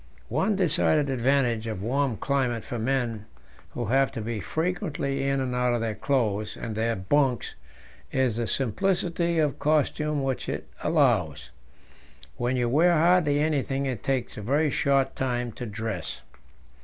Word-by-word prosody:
One 215 - +1
decided 155 -5 +2
advantage 125 -3 +1
of 105 -4 -4
a - - -4
warm 135 -1 0
climate 125 -4 0
for 120 - -5
men 115 -3 -1 0.5
who 120 - -2
have 135 +3 +2
to 115 - -4
be 110 0 -3
frequently 155 - -2
in 135 0 +1
and 130 -1 -2
out 125 -1 +1
of 120 - -1
their 115 -1 -1
clothes 105 -4 -1
and 115 - -5
their 115 +2 0
bunks 125 +6 +1 0.6
is 130 -4 +1
the 120 -1 -1
simplicity 170 - 0
of 150 -3 +1
costume 150 -1 +1
which 135 -1 -2
it - - -4 0.2
allows. 120 - +1 0.9
When 120 +2 0
you 120 -1 +1
wear 165 +8 +4
hardly 165 -2 +4
anything 140 -3 0
it 130 -6 -3
takes 130 -3 -2
a - - -5
very 145 +7 +1
short 135 -1 +1
time 125 -2 -1
to 120 +2 -7
dress. 105 -6 -4
130 Hz, 155 wpm, -26 LUFS, 115-145 Hz, 0.9 s, wear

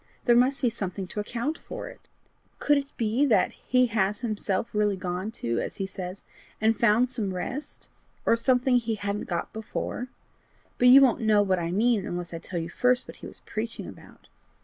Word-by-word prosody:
There 240 - +5
must 260 +3 +3
be 245 - +4
something 195 -3 -4
to 210 - -5
account 240 +9 -3
for - - -7
it. - - -14 0.5
Could 290 -1 +3
it 280 +1 -8
be 230 +4 +1
that 235 - +3
he 250 0 +1
has 210 -3 0
himself 215 -1 -2
really 210 -1 +2
gone 185 +2 -3
to 115 - -2
as - - -4
he 195 - -3
says 185 0 -7 0.4
and 220 +1 +3
found 235 +3 +3 0.2
rest 255 +11 -6 0.4
or - - +5
something 250 +1 +3
he 230 -2 -1
hadn't 205 0 -4
got 175 - -3
before? 220 +3 -4 0.7
But 250 - +5
you 265 +2 +9
won't 255 -2 +4
know 215 -2 +4
what 190 -2 +1
I 170 -1 -2
mean 220 +2 +2
unless 175 -1 -5
I 165 - -4
tell 175 - -6
you 165 - -4
first 250 +8 +1
what - - -10
he - - -9
was - - -12
preaching 230 +1 -5
about. - - -13
220 Hz, 195 wpm, -27 LUFS, 195-245 Hz, 0.7 s, you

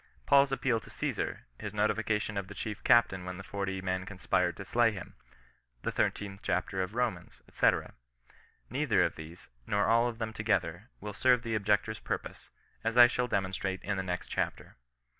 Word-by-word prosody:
Paul's 140 0 +5
appeal 130 -3 +1
to - - -15
Osesar, - - -3 0.2
his 105 0 -6
notification 105 0 0
of 100 -2 -3
the 100 - -10
chief 105 +2 -5
captain 115 -6 +4
when 90 0 -6
the 95 - -8
forty 95 -1 -3
men 95 0 -2
conspired 90 -2 0
to 95 - -7
slay 120 +1 +3
him, 100 -4 -8 0.7
the - - -1
thirteenth 100 -1 -1
chapter 95 +1 -1
of 95 0 -2
Komans, 115 -7 -2
&c. - - +4 1.0
Neither - - +2
of - - 0
these, 80 +3 -11 0.2
nor 100 0 +2
all 115 +1 +4
of 115 -2 -4
them 110 -1 -3
to 110 - -5
gether, 105 0 0
will 105 0 -5
serve 125 +3 +3
the 115 -2 -3
objector's 105 0 +1
purpose, - - -5 0.3
as 115 +1 -1
I 120 - +11
shall 125 +1 +1
de 110 - 0
monstrate 95 0 -3
in 105 - -1
the - - 0
next 90 -1 -3
chapter. - - -3
105 Hz, 185 wpm, -31 LUFS, 95-115 Hz, 1.0 s, I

